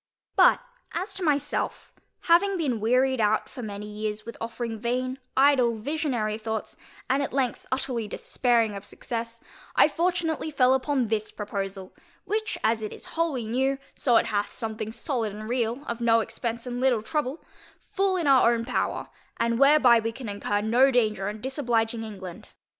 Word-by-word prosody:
But, - - +6 0.3
as 365 +5 -3
to 380 - -3
myself, 290 -2 -1 0.3
having 375 +3 +4
been 270 -9 0
wearied 255 +3 +2
out 215 0 +2
for 250 - -9
many 210 -2 -6
years 210 0 -4
with 230 - -7
offering 230 -1 -4
vain, 255 +3 -2 0.2
idle, 260 -4 +4
visionary 240 -5 -1
thoughts, 220 -1 -4 0.3
and 270 +2 +2
at 280 - -3
length 260 -3 -1
utterly 255 -4 -1
despairing 230 -2 +1
of 200 - -7
success, 230 +1 -6 0.3
I - - +7
fortunately 330 -1 -1
fell 260 -3 +4
upon 265 -3 0
this 215 -1 -1
proposal, 195 -2 -5 0.3
which, 435 0 -2
as 220 0 +2
it 215 - -4
is - - -8
wholly 320 -8 0
new, 265 +4 0 0.2
so 240 -4 +3
it - - +3
hath 205 -1 -1
something 220 -2 -4
solid 235 -4 -2
and 215 +1 -7
real, 240 +2 -1
of 235 0 -4
no 230 -1 +4
expence 235 +1 -4
and 245 0 -4
little 250 -5 +2
trouble, 300 +2 -2 0.5
full 390 -1 +1
in 340 - -1
our 260 -4 +6
own 230 0 -3
power, 250 - -1 0.3
and 230 0 +1
whereby 275 -4 +6
we 225 0 -2
can 245 +1 -8
incur 205 0 -1
no 240 +5 +4
danger 215 -6 +1
in 210 0 -7
disobliging 235 -4 0
England. 195 -5 -8
235 Hz, 170 wpm, -26 LUFS, 220-270 Hz, 0.5 s, I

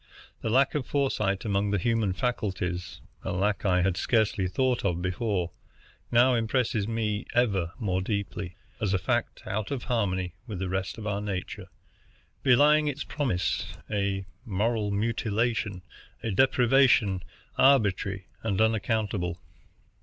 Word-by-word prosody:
The - - -2
lack 130 +4 +3
of 145 -4 -2
foresight 105 -9 0
among 100 -1 +1
the 105 - +1
human 110 -1 +1
faculties, 95 -6 -2 0.2
a - - -4
lack 100 +3 0
I 90 -1 +3
had 90 -1 +1
scarcely 110 -4 +1
thought 125 +6 0
of 90 -3 0
before, 90 0 -1 0.6
now 120 +2 +5
impresses 115 -2 0
me, 110 -1 -2
ever 100 -8 +2
more 95 -5 -1
deeply, 100 -2 -3 0.2
as 100 -3 +1
a - - +4
fact 90 - -1
out 105 0 -2
of 140 -3 -3
harmony 95 -7 -1
with 105 -4 -5
the 95 0 -3
rest 95 +1 -2
of 110 - -7
our 100 -1 -1
nature, 95 -3 -4 0.7
belying 150 +3 +5
its 145 0 -2
promise, 120 - -1 0.2
a 100 -1 -1 0.2
moral 110 0 0
mutilation, 110 -2 -1 0.4
a 115 - -1
deprivation 125 -4 +4 0.4
arbitrary 100 -7 +3 0.2
and 100 -4 -1
unaccountable. 105 -5 0
105 Hz, 135 wpm, -28 LUFS, 95-120 Hz, 0.7 s, now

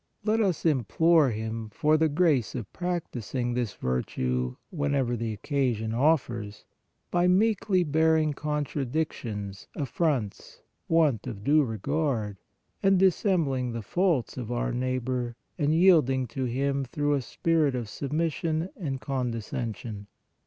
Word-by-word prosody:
Let 220 +1 +2
us 190 -6 0
implore 160 +2 +4
Him 110 0 -4
for 150 +8 +2
the 160 0 +3
grace 145 -7 +2
of 115 -6 -6
practising 130 - -3
this 120 -4 -2
virtue, 65 0 -1 0.2
whenever 140 -6 0
the 115 -1 -2
occasion 115 -2 -1
offers, 120 -6 0 0.5
by 175 0 +3
meekly 195 -1 +3
bear 160 +1 +3
ing 155 -1 +1
contradictions, 135 -8 -3
affronts, 135 - -2 0.2
want 155 -9 +2
of 105 -5 -6
due 150 +4 +4
regard, 115 -2 -1 0.4
and 195 -1 +4
dissembling 165 - +2
the 115 -1 -4
faults 170 - 0
of 120 -2 -5
our 120 +1 -1
neighbor 125 -1 -2 0.2
and 145 -1 +2
yielding 155 -7 +4
to 130 +3 -3
him 135 +3 0
through 145 +3 -1
a 140 - +1
spirit 155 +2 +1
of 120 -3 -3
submission 160 - -1
and 135 -8 -4
con 130 -3 -1
descension. 110 -2 -5
135 Hz, 130 wpm, -27 LUFS, 115-160 Hz, 0.5 s, implore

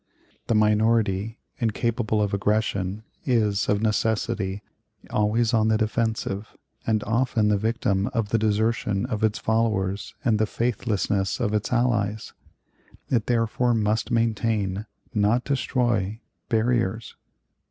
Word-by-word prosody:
The 115 - +2
minority, 110 -1 +2 0.2
incapable 110 -1 0
of 100 0 -2
aggression, 100 -1 0 0.2
is, 105 -6 +1
of 105 +1 +1
necessity, 105 -2 0 0.5
always 110 +3 +1
on 110 -1 +3
the 110 0 +3
defensive, 110 -2 -2 0.3
and 110 -2 +1
often 115 -1 +1
the 105 - +3
victim 105 -3 0
of 115 -4 -2
the 115 - +2
desertion 110 -1 +1
of 110 -4 -3
its 110 -1 +2
followers 105 -4 0
and 110 -4 +3
the 110 - +2
faithlessness 105 -4 -1
of 105 - 0
its 105 0 -1
allies. 115 -4 0 0.8
It 115 -4 +1
therefore 120 +1 +1
must 110 0 0
maintain, 110 -3 0 0.3
not 110 +4 +2
destroy, 120 -6 0 0.3
barriers. 115 -2 0
110 Hz, 120 wpm, -25 LUFS, 105-115 Hz, 0.8 s, on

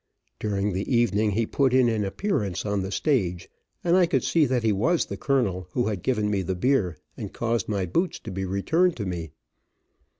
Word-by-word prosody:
During 100 -1 -1
the 95 +8 -3
evening 110 -3 +2
he 115 +3 +1
put 130 +2 +1
in 130 -2 +5
an 110 -3 +1
appearance 105 - -2
on 100 -1 0
the 95 +1 -4
stage, 95 - 0 0.4
and 175 0 +3
I 185 -2 +5
could 135 -6 +1
see 160 -4 +3
that 125 -2 0
he 110 - +3
was 140 - +2
the - - -6
colonel 120 -12 0
who 120 -3 +1
had 100 -4 -3
given 105 -3 0
me 100 -2 +1
the 95 0 -2
beer, 100 - +1 0.2
and - - -6
caused 115 -3 -1
my 100 -3 0
boots 170 - 0
to 110 - -7
be 95 +1 -3
returned 160 - +1
to 105 - -3
me. 85 -3 -4
110 Hz, 205 wpm, -25 LUFS, 95-130 Hz, 0.4 s, in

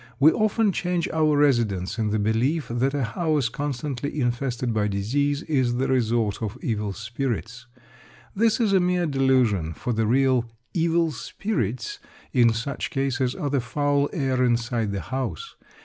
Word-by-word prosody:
We 150 +3 +7
often 215 +2 +2
change 175 -2 -1
our 155 -2 +2
residence 115 -9 +1
in 110 -1 +1
the 110 - 0
belief 115 +8 0
that 130 +4 0
a 140 - 0
house 145 +2 0
constantly 145 +1 -3
infested 120 -1 -1
by 105 -1 +1
disease 140 - 0
is 130 -6 +1
the 130 +2 0
resort 115 -5 +1
of 110 +2 -4
evil 105 -3 -2
spirits. 115 +2 -4 0.7
This 225 +3 +2
is 215 -4 +2
a 190 - +5
mere 180 0 +1
delusion, 130 - +2
for 125 - -3
the 110 -1 0
real 130 -1 +2 0.2
"evil 165 -1 +2
spirits" 125 - -3 0.3
in 120 -2 +5
such 125 +5 -3
cases 135 -3 -1
are 145 - -3
the 140 -3 +1
foul 145 +3 0
air 130 -5 0
inside 120 -3 0
the 100 -1 -3
house. 135 - -4
130 Hz, 155 wpm, -24 LUFS, 115-145 Hz, 0.7 s, We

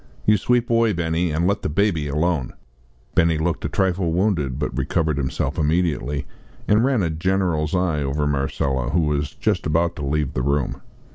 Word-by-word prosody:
You 105 - +5
sweep 120 +4 +1
away, 115 -2 +3
Benny, 85 0 0
and 80 +2 0
let 100 +2 +1
the - - -2
baby 80 -2 +1
alone." 75 -1 0 0.6
Benny 80 -1 +3
looked 80 +2 -1
a - - -1
trifle 95 -3 0
wounded, 85 -8 0
but 75 - -3
recovered 75 -3 0
himself 70 +3 -2
immediately, 75 -3 0 0.4
and 105 +2 +4
ran 130 -6 +2
a 85 - 0
general's 85 -2 0
eye 85 -5 +1
over 70 +2 -1
Marcella 70 -2 -1
who 85 +4 +2
was 75 -2 -1
just - - 0
about 85 +2 +1
to 75 - -5
leave 75 0 -1
the 65 - -1
room. 70 +1 -1
80 Hz, 180 wpm, -22 LUFS, 75-90 Hz, 0.6 s, You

